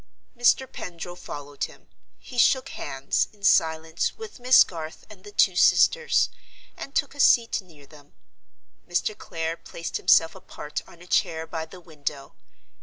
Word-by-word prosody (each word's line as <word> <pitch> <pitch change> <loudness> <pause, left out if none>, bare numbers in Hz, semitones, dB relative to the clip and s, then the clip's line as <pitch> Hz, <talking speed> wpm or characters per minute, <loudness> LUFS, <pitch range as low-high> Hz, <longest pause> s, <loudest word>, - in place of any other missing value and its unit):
Mr. 245 +2 +3
Pendril 175 -6 -8
followed 145 -5 -6
him. - - -16 0.3
He 250 - -7
shook 260 +2 +4
hands, 135 +1 -2
in 205 -1 -24
silence, 160 -2 +2
with 440 - -10
Miss 250 +1 +7
Garth 160 -2 -8
and 190 -3 -15
the 205 - -11
two 190 -2 +3
sisters, 475 - +4 0.5
and 275 - -9
took 280 - 0
a 285 - -15
seat 230 -5 +4
near 160 -6 -18
them. 145 -1 -18 0.8
Mr. 175 +4 0
Clare 165 -4 -4
placed 170 - -6
himself 165 0 +4
apart 165 -5 -7
on 170 0 -16
a - - -14
chair 165 -3 0
by 160 0 -5
the 180 +3 -12
window. 150 -4 -6
170 Hz, 155 wpm, -25 LUFS, 160-215 Hz, 0.8 s, Miss